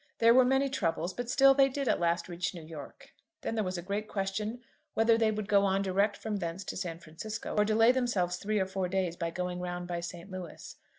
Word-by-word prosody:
There 230 0 +6
were 255 +1 +7
many 265 +2 +3
troubles; 185 -8 -1
but 245 -1 -5
still 270 +1 +6
they 275 0 +5
did 275 0 -3
at - - +2
last 170 0 +1
reach 175 0 -3
New 170 - -8
York. 155 -2 -11 0.3
Then - - -3
there 220 -1 0
was 185 -1 -3
a 175 - -5
great 200 +3 -3
question 210 +4 -3 0.3
whether 225 +1 +5
they 225 -1 +3
would 215 -1 -3
go 200 -1 +4
on 195 0 +2
direct 200 +2 +1
from 215 -2 -3
thence 170 +1 -4
to - - -5
San 175 -3 -4
Francisco, 170 +7 -6
or 210 - +4
delay 220 +3 +5
themselves 210 -9 0
three 215 +1 -1
or 190 - +2
four 190 -1 -2
days 185 -2 0
by 170 -1 -2
going 180 +1 -3
round 175 0 -4
by 175 -1 -2
St. 175 +2 -7
Louis. 185 -3 -8
195 Hz, 235 wpm, -30 LUFS, 175-225 Hz, 0.3 s, were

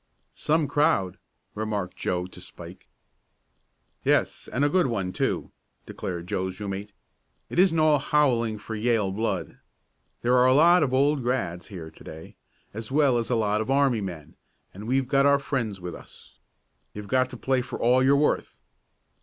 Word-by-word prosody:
"Some 155 -1 +1
crowd," 145 - +1 0.3
remarked 105 -4 -3
Joe 90 -1 -2
to 95 - -13
Spike. - - -11 1.2
"Yes, - - 0
and 140 +3 +1
a - - +4
good 180 -1 +2
one, 100 -6 -2
too," - - -2 0.3
declared 85 -2 -5
Joe's 95 +1 -3
room 100 -1 -4
mate. 100 +2 -6 0.6
"It - - -1
isn't 180 -3 +4
all 155 -2 +4
howling 125 -7 +1
for 110 +2 -8
Yale 110 -3 +1
blood. 110 +4 -3 0.6
There 120 +1 +3
are 125 0 +5
a 130 - +4
lot 170 +4 +6
of 140 -4 +1
old 140 +2 +2
grads. 100 -9 -2
here 85 -5 -9
to - - -17
day, 80 +1 -11 0.4
as 110 +3 -7
well 140 -4 +3
as 115 - -4
a 125 - +2
lot 105 -1 +1
of 110 - -4
army 135 -4 +2
men, 80 -6 -7 0.4
and 105 +3 -9
we've 130 +1 +1
got 140 +1 +3
our 140 0 +5
friends 120 -8 -3
with 90 -1 -6
us. - - -14 0.6
You've 105 0 -7
got 130 +2 +2
to 125 - -8
play 130 +1 0
for 125 - -6
all 125 +2 +3
you're 135 +2 +5
worth." 150 - 0
120 Hz, 175 wpm, -26 LUFS, 100-140 Hz, 1.2 s, lot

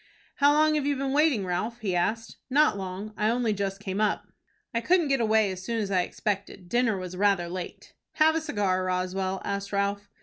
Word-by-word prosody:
"How 285 +1 +5
long 310 +1 +4
have 295 -2 0
you 290 - +1
been 270 0 -2
waiting, 290 -9 +3
Ralph?" 210 +7 -3
he 190 -4 -1
asked. 225 +6 -1
"Not 295 -2 +4
long. 195 +2 -6
I 215 +1 +2
only 235 -2 +1
just 195 -1 -3
came 200 0 -3
up." 215 - +1 0.5
"I 230 - 0
couldn't 340 +3 +2
get 270 -3 +2
away 220 -2 +3
as 185 0 -7
soon 230 +3 -2
as 200 -2 -2
I 185 -2 +3
expected. 195 -1 -4
Dinner 240 -2 +2
was 185 -1 -6
rather 195 -2 +2
late." 180 0 -7 0.2
"Have 315 0 +4
a 325 - 0
cigar, 205 - 0
Roswell?" 185 +1 -2
asked 200 0 -3
Ralph. 200 0 -1
205 Hz, 205 wpm, -27 LUFS, 190-245 Hz, 0.5 s, How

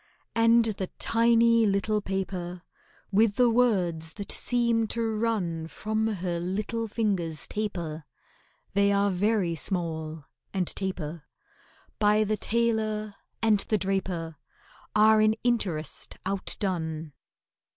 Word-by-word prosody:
And 230 0 +5
the 200 -4 -2
tiny 230 0 +4
little 205 +2 +1
paper, 185 -2 -4 0.5
With 210 +1 +3
the 245 0 +4
words 180 -10 +1
that 200 -1 -4
seem 235 -2 +2
to 225 0 -1
run 190 -8 -1
From 220 +5 -2
her 180 -5 -2
little 210 +6 -2
fingers 190 -8 -1
taper 170 -7 -4 0.7
(They 200 +1 +3
are 200 0 +2
very 195 -1 +1
small 160 -3 -3 0.3
and 185 -2 +1
taper), 170 -5 -4 0.7
By 210 0 +4
the 215 0 0
tailor 215 -2 0 0.3
and 215 -2 +4
the 215 - +1
draper 185 -4 -2 0.6
Are 215 0 +6
in 215 0 +4
interest 190 - -1
outdone. 170 -5 -2
200 Hz, 110 wpm, -27 LUFS, 175-220 Hz, 0.7 s, Are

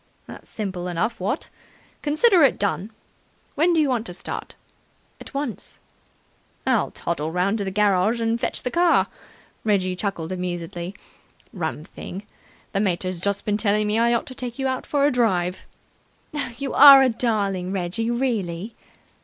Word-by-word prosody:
"That's - - -11
simple 185 -4 -4
enough, 195 +7 -1
what? 205 - -2 0.5
Consider 340 +6 +4
it 275 -4 +5
done. 200 0 -1 0.6
When 325 +4 +3
do 335 - +3
you 300 - +3
want 245 -4 -1
to 180 - -8
start?" - - -6 0.6
"At - - -10
once." 275 -5 -4 0.9
"I'll - - +2
toddle 160 -2 -3
round 190 +5 +1
to - - -1
the 195 - -2
garage 205 +2 +2
and 230 +1 0
fetch - - -2
the 250 - -2
car." 345 -1 +4 0.6
Reggie 185 -4 +1
chuckled 180 -4 -3
amusedly. 175 0 -4 0.6
"Rum 160 -5 -3
thing! 190 +4 -8 0.5
The 195 - +1
mater's 185 -2 -1
just 200 +2 -1
been 210 -1 +1
telling 210 0 +1
me 210 +2 +1
I 235 +1 +3
ought 235 - -1
to 260 - -9
take 245 -2 -6
you 270 -1 -1
for 285 -1 +1
a 290 - +4
drive." 185 -7 0 0.9
"You 280 -1 -3
are 275 -1 +10
a 260 - +4
darling, 200 -6 -1
Reggie, 195 +5 -2
really!" 225 -6 -2
210 Hz, 155 wpm, -23 LUFS, 180-245 Hz, 0.9 s, are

